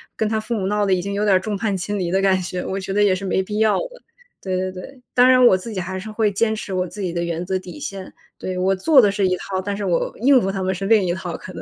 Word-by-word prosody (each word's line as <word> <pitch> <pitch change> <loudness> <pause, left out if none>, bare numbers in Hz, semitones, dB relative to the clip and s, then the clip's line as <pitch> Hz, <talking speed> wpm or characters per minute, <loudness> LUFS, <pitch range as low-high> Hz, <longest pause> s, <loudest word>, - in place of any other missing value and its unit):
跟 220 - 0
他 220 0 0
父 225 +2 -3
母 200 -4 -2
闹 205 +1 0
得 190 - +3
已 180 - +1
经 200 +1 -4
有 205 +1 -1
点 200 -3 +4
儿 - - +4
众 205 +2 -3
叛 200 -1 -1
亲 205 +3 -3
离 175 -2 -1
的 190 - +1
感 190 -1 +2
觉， 180 0 -4
我 195 - -3
觉 190 0 -5
得 205 +1 +3
也 200 -2 +4
是 185 +1 -4
没 190 0 0
必 210 +2 -4
要 220 -1 +3
的， - - -6 0.4
对 185 -1 -2
对 185 0 -2
对。 250 +8 -11
当 250 +1 +5
然 255 -1 +6
我 215 - +7
自 185 +5 -5
己 195 - -4
还 190 +1 -4
是 215 +3 -8
会 215 -1 +1
坚 220 +2 +1
持 205 -2 -6
我 180 0 -1
自 205 - -11
己 180 -3 -2
的 170 0 -1
原 170 +1 -3
则 185 0 -1
底 185 +10 -10
线。 195 -8 -7 0.3
对， 185 -1 -4
我 190 +1 +2
做 265 +9 +5
的 205 -4 +5
是 200 -1 +1
一 185 0 0
套， 190 0 -4
但 200 +1 -3
是 205 - -3
我 175 -2 0
应 260 +2 +5
付 195 - -1
他 195 -1 -3
们 190 0 0
是 195 +2 -4
另 220 -2 +4
一 175 - 0
套 175 -2 -5
可 185 - -10
能。 - - -7
195 Hz, 350 characters per minute, -21 LUFS, 185-210 Hz, 0.4 s, 我